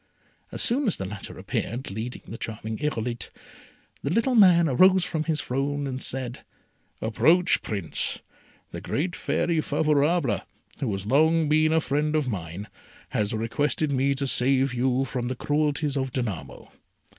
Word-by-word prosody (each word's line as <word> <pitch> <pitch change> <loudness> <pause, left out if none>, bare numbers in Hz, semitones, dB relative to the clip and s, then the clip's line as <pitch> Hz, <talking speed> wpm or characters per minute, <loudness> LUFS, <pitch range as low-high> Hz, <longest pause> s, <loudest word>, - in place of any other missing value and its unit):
As - - -2
soon 260 +3 +1
as 200 - +1
the 95 - -4
latter 100 +1 -7
appeared 120 0 -4
leading 110 +5 -5
the 115 - -7
charming 110 0 -5
Irolite, 120 -5 -3 0.7
the 140 - -2
little 230 - +1
man 180 -7 +6
rose 185 +6 +5
from 160 -3 -2
his 160 -2 0
throne 140 +3 -2
and 130 -1 -4
said, 130 -2 -2 0.6
"Approach, 155 +12 +3
Prince. 100 -7 0 0.5
The - - -6
great 175 +5 -2
Fairy 165 -2 0
Favourable, 150 - +1 0.4
who 125 -6 -1
has 95 0 -4
long 155 +6 +3
been 155 +1 +3
a 160 - +4
friend 150 +1 0
of 150 -3 +1
mine, 90 -2 -5 0.4
has 105 -1 -1
requested 140 +7 -1
me 140 +1 +1
to 140 +1 -2
save 135 0 +2
you 130 +2 +1
from 125 -1 -3
the 130 - -2
cruelties 150 +1 0
of 135 -1 -1
Danamo. 95 - -5
135 Hz, 155 wpm, -25 LUFS, 120-155 Hz, 0.7 s, man